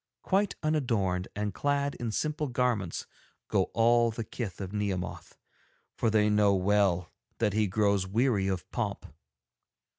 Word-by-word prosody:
Quite 195 +1 +1
unadorned 115 -12 0
and 105 -1 -2
clad 140 +2 0
in 120 -2 -4
simple 150 +5 -1
garments 120 -8 -1 0.4
go - - +2
all 120 +1 +4
the 115 +1 -4
kith 105 -4 -6
of 95 0 -5
Nehemoth, 100 -4 -3 0.6
for 115 - +1
they 105 -1 +3
know 105 -1 +4
well 95 -2 +2 0.2
that 105 -3 +1
he 110 0 +2
grows 100 -1 +1
weary 110 -1 +1
of 95 -4 -2
pomp. - - -3
105 Hz, 140 wpm, -29 LUFS, 95-120 Hz, 0.6 s, all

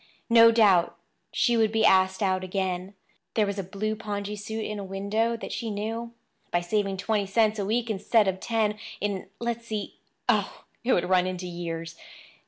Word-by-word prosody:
No 230 0 +9
doubt 200 -7 +4 0.3
she 240 -2 +2
would 220 -2 +3
be 225 0 +2
asked 190 +1 +4
out 185 -1 +1
again. 185 0 -3 0.4
There 215 - +3
was 200 0 -3
a - - -2
blue 205 +4 -3
pongee 210 -1 -4
suit 220 +2 -5
in 210 -1 -4
a - - -5
window 200 +4 -1
that - - -7
she 230 - -3
knew—by 225 -3 -4
saving 195 +1 -1
twenty 205 +1 0
cents 215 +1 +2
a 200 - -1
week 235 +2 0
instead 215 0 +2
of 190 0 0
ten, 215 -2 0 0.2
in—let's 215 +4 -4
see—Oh, 215 -2 -3 0.2
it 250 - +3
would 175 - +1
run 185 0 +3
into 185 0 -4
years! 165 -1 -5
205 Hz, 170 wpm, -27 LUFS, 190-225 Hz, 0.4 s, No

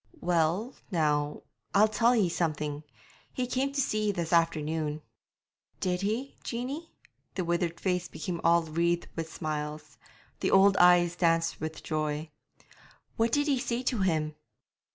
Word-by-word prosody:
'Well, 175 +8 +1 0.2
now, 150 -5 0 0.3
I'll 210 +2 +7
tell 235 +3 +3
ye 210 -6 +3
something. 150 -3 -2 0.5
He 255 - -2
came 260 +2 -1
to 280 - -3
see 215 -5 +1
ye - - +3
this 175 -3 -3
afternoon.' 155 -2 +1 0.8
'Did 180 -1 -1
he, 225 +7 -2
Jeanie?' 270 +8 -4 0.5
The 185 - -1
withered 170 0 -1
face 180 -2 0
became 170 +1 -5
all 170 0 +4
wreathed 170 +2 0
with 165 -1 -4
smiles; 150 -1 -5 0.4
the - - 0
old 195 +1 +6
eyes 175 -1 +5
danced 165 -2 +1
with 155 0 -5
joy. 155 0 -2 0.8
'What 225 0 +1
did 290 +4 +2
ye 275 -3 +2
say 245 0 -2
to 250 -3 0
him?' 160 -5 +1
170 Hz, 145 wpm, -29 LUFS, 155-215 Hz, 0.8 s, I'll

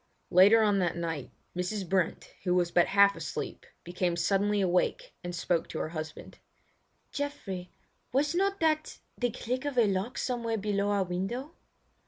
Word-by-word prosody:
Later 205 +5 +7
on 205 -2 +3
that 175 -2 0
night, 165 -5 -3 0.3
Mrs. 180 +2 -2
Brent, 185 -1 -1
who 180 -1 +2
was 175 -1 +2
but 175 -1 +4
half 200 0 +5
asleep, - - -5 0.2
became 175 0 -1
suddenly 200 +4 +1
awake 190 - +1
and 175 0 -4
spoke 170 0 0
to - - -5
her 155 - -2
husband: 155 -1 -7 0.7
"Geoffrey, 220 -12 -4 0.4
was 290 +4 +1
not 395 +2 +1
that 310 -1 +1 0.2
the 245 - 0
click 250 +3 -3
of 290 -3 -3
a 235 - +6
lock 200 +4 -1
somewhere 235 -3 -1
below 205 -1 0
our 200 -1 +2
window?" 195 - -4
200 Hz, 160 wpm, -29 LUFS, 180-245 Hz, 0.7 s, Later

